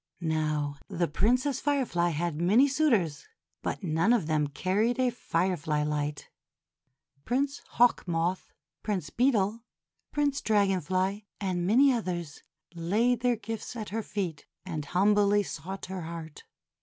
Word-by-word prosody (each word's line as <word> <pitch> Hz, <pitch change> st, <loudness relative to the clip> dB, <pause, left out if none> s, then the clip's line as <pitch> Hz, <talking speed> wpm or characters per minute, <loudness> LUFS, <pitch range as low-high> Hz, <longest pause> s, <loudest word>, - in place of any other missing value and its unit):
Now, 150 Hz, -2 st, -1 dB
the 170 Hz, 0 st, -1 dB
Princess 250 Hz, -, +1 dB
Firefly 255 Hz, -12 st, +1 dB
had 165 Hz, 0 st, -2 dB
many 215 Hz, +11 st, +5 dB
suitors, 235 Hz, -, +1 dB, 0.3 s
but -, -, -3 dB
none 165 Hz, +6 st, +2 dB
of 220 Hz, -9 st, +2 dB
them 155 Hz, -2 st, +1 dB
carried 195 Hz, -, 0 dB
a 255 Hz, -1 st, +3 dB
firefly 165 Hz, -8 st, -1 dB
light. 150 Hz, -1 st, -2 dB, 1.0 s
Prince 275 Hz, -, -1 dB, 0.2 s
Hawk 240 Hz, -5 st, +4 dB
Moth, 170 Hz, +2 st, -1 dB, 0.3 s
Prince 185 Hz, -8 st, -3 dB
Beetle, 230 Hz, -4 st, +2 dB, 0.5 s
Prince 290 Hz, -2 st, 0 dB
Dragon 200 Hz, -4 st, +2 dB
Fly, 190 Hz, +5 st, -1 dB
and 180 Hz, -3 st, -1 dB
many 260 Hz, +6 st, +5 dB
others 175 Hz, -9 st, -3 dB, 0.3 s
laid 215 Hz, +9 st, +1 dB
their 245 Hz, 0 st, +2 dB
gifts 225 Hz, +2 st, -6 dB
at 215 Hz, -3 st, -5 dB
her 225 Hz, +3 st, -2 dB
feet, 185 Hz, -8 st, -4 dB, 0.2 s
and 155 Hz, -5 st, -4 dB
humbly 205 Hz, +4 st, +3 dB
sought 190 Hz, +2 st, -6 dB
her 190 Hz, -1 st, -5 dB
heart. 160 Hz, -2 st, -8 dB
190 Hz, 130 wpm, -29 LUFS, 165-230 Hz, 1.0 s, many